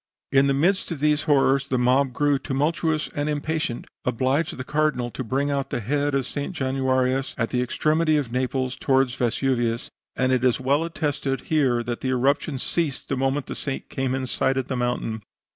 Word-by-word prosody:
"In 135 +1 +5
the 140 - +2
midst 180 +7 +2
of 165 -5 -4
these 150 +1 +2
horrors, 135 -1 +3
the 130 - +1
mob, 130 +2 +3
growing 145 +2 +1
tumultuous 155 +3 0
and 145 +1 -1
impatient, 150 -3 -2 0.2
obliged 130 +6 0
the 130 - -4
Cardinal 150 -4 0
to 130 - -5
bring 135 +5 0
out 140 -1 -1
the - - -2
head 145 +5 0
of 135 -2 0
St. 145 +8 -4
Januarius, 130 -1 0
at 115 -2 -1
the 125 - +1
extremity 155 +5 +2
of 135 -5 -2
Naples, 130 +1 -1
toward 135 -3 +2
Vesuvius; 120 -1 0 0.2
and 130 0 +1
it 130 -1 +2
is 125 -2 +3
well 140 +4 +2
attested 145 -5 -2
here 130 -7 +1
that 120 0 -4
the 130 - -1
eruption 135 +3 +1
ceased 145 +1 -2
the 135 - 0
moment 135 +2 0
the - - -5
saint 135 - -5
came 130 -1 -1
in 130 0 -2
sight 130 +1 0
of 130 -1 -2
the 130 - -1
mountain. 120 -3 -2
135 Hz, 195 wpm, -24 LUFS, 130-145 Hz, 0.2 s, In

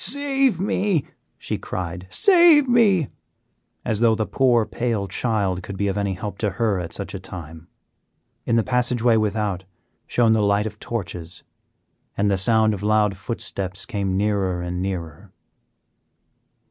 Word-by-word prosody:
"Save 270 - +1
me!" 195 -4 0 0.3
she - - -4
cried, 90 0 -5
"save 340 - +5
me!" 205 - +3 0.8
as 110 - 0
though 115 -1 +4
the 110 -1 -1
poor, 120 -3 +2
pale 115 -5 -2
child 100 -3 -1
could 95 +2 -7
be 100 - 0
of 95 - -1
any 100 -2 -1
help 100 +1 -6
to 105 - 0
her 110 -5 +1
at 85 -2 -5
such 100 - -5
a 95 - -5
time. 80 -3 -10 0.8
In 115 - 0
the 115 - +3
passageway 125 -1 +2
without 105 -3 -1 0.4
shone 115 -2 +3
the 110 - +2
light 100 0 +2
of 105 -1 -6
torches, 90 -6 -6 0.7
and 100 0 +2
the 95 - +2
sound 110 +1 +3
of 100 - -5
loud 105 -1 +2
footsteps 95 -2 -5
came 100 -5 -2
nearer 100 -3 0
and 90 +1 -3
nearer. 85 -5 -5
105 Hz, 150 wpm, -22 LUFS, 95-120 Hz, 0.8 s, save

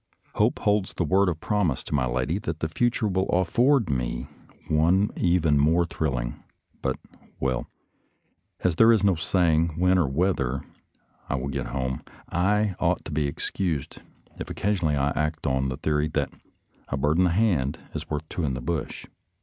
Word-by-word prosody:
Hope - - +2
holds 105 -2 0
the - - 0
word 95 +4 +3
of 80 -3 -3
promise 90 -11 0
to - - -6
my 65 -4 +2
lady 65 +9 -1
that 80 -6 -4
the 80 - -1
future 120 +6 0
will 95 -1 0
afford 115 +7 +3
me 60 -3 -2 0.4
one 85 +6 +3
even 85 -5 +2
more 80 +4 +3
thrilling, 65 -8 -3 0.4
but 65 -1 -1 0.2
— - - -28
well, 65 -1 -1 0.9
as 90 -3 +1
there 115 +1 +7
is 110 -4 +3
no 100 -1 +5
saying 85 -1 +1
when 90 +1 +4
or 80 - +2
whether 70 -3 0 0.7
I - - 0
will 70 +1 -3
get 70 -1 -3
home, 65 -2 -3 0.3
I 105 +3 +2
ought 90 0 0
to - - -6
be 75 -1 0
excused 80 0 -3 0.4
if - - -5
occasion 100 -5 0
ally 75 -1 +1
I 70 +1 +2
act 75 +1 -2
on 65 -1 +1
the 65 - -4
theory 75 -1 0
that 70 -2 0 0.3
" - - -42
a 70 - -2
bird 75 +4 +1
in 90 - +5
the - - +3
hand 85 -8 +1 0.2
is - - -6
worth 75 +1 -3
two 85 - -4
in 70 -4 0
the - - -4
bush." 80 +2 -3
80 Hz, 185 wpm, -26 LUFS, 70-95 Hz, 0.9 s, there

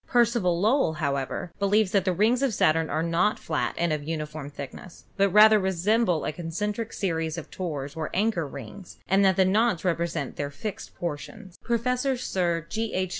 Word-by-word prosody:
Percival 235 -8 +2
Lowell, 220 - +2
however, 140 +2 -2
believes 200 0 +2
that 195 -2 +2
the 185 - +2
rings 220 +8 +2
of 265 -6 +1
Saturn 160 -1 +2
are 155 - 0
not 170 +6 +1
flat 160 - -2
and 170 -2 +1
of 150 - -2
uni 155 0 -3
form 150 -1 -8
thickness, 145 +5 -10
but 200 0 +3
rather 215 +2 +7
resemble 190 0 +1
a - - -1
concentric 205 +8 -4
series 165 -4 -2
of 165 - -8
tores 145 -6 -5
or 160 -1 -3
anchor 195 -5 0
rings, 140 - -10
and 195 +1 +3
that 190 -2 +4
the 190 - +4
knots 195 -2 +2
represent 170 -5 -1
their 145 -1 -2
fixed 195 +8 -7
portions. 175 +4 -6
Professor 250 +3 0
Sir 175 -8 -1
G. 220 +5 -3
H. 185 0 0
180 Hz, 180 wpm, -26 LUFS, 160-210 Hz, -, rather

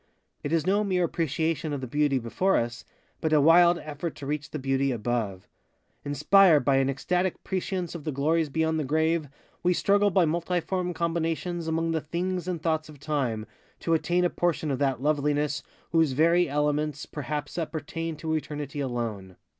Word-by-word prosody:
It 145 - -3
is 165 -1 +1
no 200 +3 +2
mere 185 -3 +1
appreciation 160 -1 -1
of 140 - -2
the - - -3
Beauty 145 +2 +1
before 130 +11 +1
us, 120 +1 -3 0.3
but 160 - -1
a 155 - +5
wild 170 +3 +6
effort 155 +1 -5
to 140 - -8
reach 150 +2 -3
the - - -4
Beauty 135 0 0
above. 110 -5 -2 0.6
Inspired 150 +3 +5
by 135 -1 +4
an 135 0 +2
ecstatic 180 +7 -1
prescience 185 -1 -3
of 170 -4 -7
the 155 - -2
glories 155 +3 +1
beyond 160 +2 0
the - - 0
grave, 160 +1 +1 0.3
we 180 0 +2
struggle 205 +2 +3
by 185 -2 +3
multiform 175 +2 -1
combinations 170 0 -2
among 165 +1 0
the 160 -1 0
things 180 +3 -3
and 180 -2 -2
thoughts 160 -1 0
of 150 -2 -13
Time 130 -7 -1 0.3
to 165 - 0
attain 175 +2 +2
a 175 - +1
portion 165 -3 0
of 135 - -1
that 135 -3 0
Loveliness 145 -1 +1 0.3
whose 160 -4 +3
very 170 +4 +3
elements 150 0 0
perhaps 150 +2 -4
appertain 165 0 -4
to 160 +1 -3
eternity 150 -2 -4
alone. 115 -8 -3
155 Hz, 175 wpm, -27 LUFS, 140-170 Hz, 0.6 s, wild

